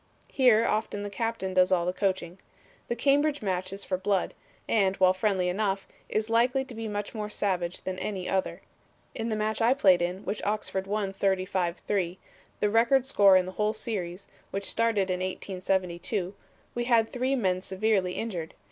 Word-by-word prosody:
Here 240 -4 +5
often 210 -2 -1
the 205 - -5
captain 225 -3 -2
does 185 0 +4
all 175 -2 +3
the 180 - 0
coaching. 185 -2 -2 0.5
The 235 - -1
Cambridge 285 +2 +2
match 185 -1 -2
is 195 +1 -6
for 185 - -1
blood, 195 -1 0 0.3
and, 195 -4 +2
while 185 -1 +4
friendly 185 -1 0
enough, 195 +1 -1 0.2
is 215 0 0
likely 245 +4 +2
to 255 - -10
be 225 -1 -5
much 205 -1 -4
more 210 -2 -4
savage 180 -4 -2
than 185 0 -4
any 190 -3 -3
other. 190 -1 -1 0.5
In 225 +1 -3
the 220 - 0
match 215 +1 -1
I 240 +4 +4
played 185 -9 +5
in, 180 +3 -2
which 200 +2 -3
Oxford 200 -2 -2
won 200 -1 -1
35 185 -2 0
3, 185 -3 -2 0.4
the 210 - +2
record 240 +4 +4
score 200 -8 +6
in 185 - +2
the 185 - -6
whole 210 +2 0
series, 195 -5 -4 0.2
which 195 0 -3
started 215 -5 +1
in 180 - -1
1872, 185 0 -2 0.4
we 240 0 -2
had 230 -2 +4
three 255 +3 -1
men 185 -7 0
severely 190 -1 0
injured. 180 -8 -4
200 Hz, 180 wpm, -28 LUFS, 185-225 Hz, 0.5 s, score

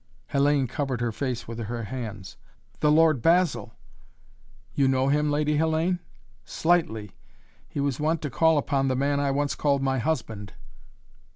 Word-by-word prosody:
Hellayne 140 -1 +3
covered 130 0 -3
her 120 -1 -1
face 125 +1 -4
with 115 0 -6
her 115 +1 -4
hands. 110 -4 -6 0.4
"The 150 - +3
Lord 155 -4 +4
Basil!" 155 - +2 1.0
"You 140 -1 +2
know 130 0 +2
him, 150 +1 +2
Lady 150 0 +1
Hellayne?" 160 +3 +1 0.4
"Slightly. 115 - 0 0.6
He 150 - -5
was 140 -2 -1
wont 155 +2 +1
to 150 - -3
call 160 +4 +3
upon 140 -1 0
the 130 - +1
man 140 +2 +1
I 140 -1 +1
once 145 +1 0
called 140 -2 +1
my 135 -1 +1
husband." 110 -7 -3
140 Hz, 155 wpm, -26 LUFS, 120-150 Hz, 1.0 s, Lord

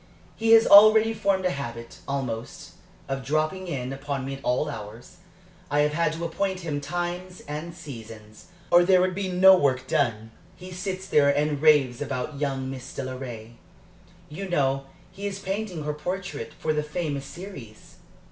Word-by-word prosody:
He 225 0 +3
has 225 0 +7
already 215 +2 +8
formed 195 -3 0
a 180 - +2
habit, 120 -5 -7
almost, 125 -4 -4 0.4
of 135 -1 -3
'dropping 155 +6 -1
in' 130 -5 -3
upon 135 -1 -4
me 135 - -4
at 135 0 -9
all 125 +5 +1
hours. 115 +3 -9 0.5
I 145 0 +2
have 150 0 +1
had 165 0 +1
to 165 +1 -4
appoint 185 +3 -2
him 150 -4 -3
times 175 +3 -4
and 150 +3 -5
seasons, 115 -9 -11 0.3
or 175 0 +7
there 185 0 +5
would 185 0 +1
be 190 0 -3
no 190 +1 +7
work 130 -6 +1
done. 110 -5 0 0.2
He 185 +1 -11
sits 185 +1 -5
here 140 -1 +5
and 145 0 +1
raves 145 -6 +4
about 140 +1 -4
young 135 -2 -2
Mrs. 130 -1 -8
Delaray 125 -4 -7 0.7
you 190 +6 -7
know 135 -4 0 0.2
he 195 +2 -5
is 195 -1 -4
painting 195 -4 -4
her 150 0 -2
portrait, 175 -5 -5
for 155 - -1
the 150 - 0
famous 150 -2 -3
series? 165 - -11
150 Hz, 165 wpm, -25 LUFS, 135-185 Hz, 0.7 s, already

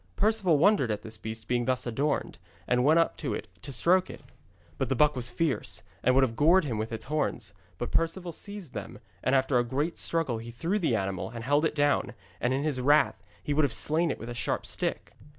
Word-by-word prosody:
Perceval 205 -6 +3
wondered 170 - +4
at 105 -1 -2
this 110 0 -5
beast 110 0 -6
being 120 -1 0
thus 130 0 0
adorned, 135 +6 -1 0.3
and 125 0 +2
went 155 +4 +5
up 165 - +2
to - - -2
it - - -6
to 140 - -7
stroke 180 +9 +3
it. - - -10 0.6
But - - -1
the 135 - +1
buck 150 +3 +4
was 120 -2 0
fierce, 150 +3 -1 0.2
and 130 +1 +3
would 135 - +5
have 115 -3 0
gored 165 +7 +5
him 120 -7 -3
with 110 +2 -3
its 110 0 -4
horns, 130 -7 -2 0.2
but 120 - -4
Perceval 170 +2 0
seized 200 -2 -7
them, 105 -1 -6 0.3
and 130 - +2
after 130 -1 +3
a - - +2
great 145 +7 -2
struggle 160 -9 0
he 115 +1 -8
threw 165 - -1
the 160 - +1
animal, 95 -3 -2
and 115 0 -7
held 145 +5 +2
it 160 - -1
down, 145 -4 +1 0.2
and 120 - 0
in 135 +2 0
his 145 -4 -1
wrath 145 +4 +3 0.2
he 145 - -1
would 155 - +3
have 140 - +1
slain 160 +2 +1
it - - -2
with 115 - -8
a - - -4
sharp 115 -2 -2
stick. - - -3
135 Hz, 230 wpm, -28 LUFS, 120-160 Hz, 0.6 s, went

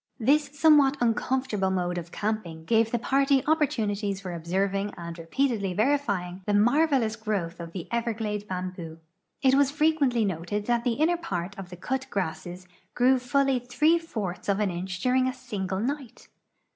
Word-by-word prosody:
This 285 +5 +3
somewhat 290 -2 +5
uncomfortable 240 -3 0
mode 180 -1 -1
of 170 0 -10
camping 205 -7 -3
gave 225 +3 +3
tbe 240 0 -2
party 275 0 +3
oj)))ortunities 215 -10 0
for 185 -3 -6
observing 195 +4 -1
and 170 -1 -6
re 165 - -9
])eatedly 210 -4 0
verifying 205 -8 0
tbe 205 - +2
marvelous 245 0 +3
growth 200 -6 -3
of 170 -1 -7
the 175 -2 -6
everglade 220 -3 -2
bam 185 -1 -3
boo. 165 -3 -9 0.5
It 265 -1 +5
was 275 0 +4
frequently 290 -6 +2
noted 195 +3 -3
that 235 0 +1
the 245 - +1
inner 320 +7 +2
]>art 190 - -4
of 195 -2 -8
the 180 - -9
cut 265 +8 -3
grasses 180 -1 -4 0.3
grew 255 +1 +4
fully 270 +1 +1
three 300 +7 +2
fourths 205 - -5
of 200 0 +2
an 205 -3 +1
inch 185 +1 -5
during 255 0 +2
a 260 - -1
single 190 -7 -4
night. 265 +1 -4
215 Hz, 170 wpm, -27 LUFS, 185-265 Hz, 0.5 s, somewhat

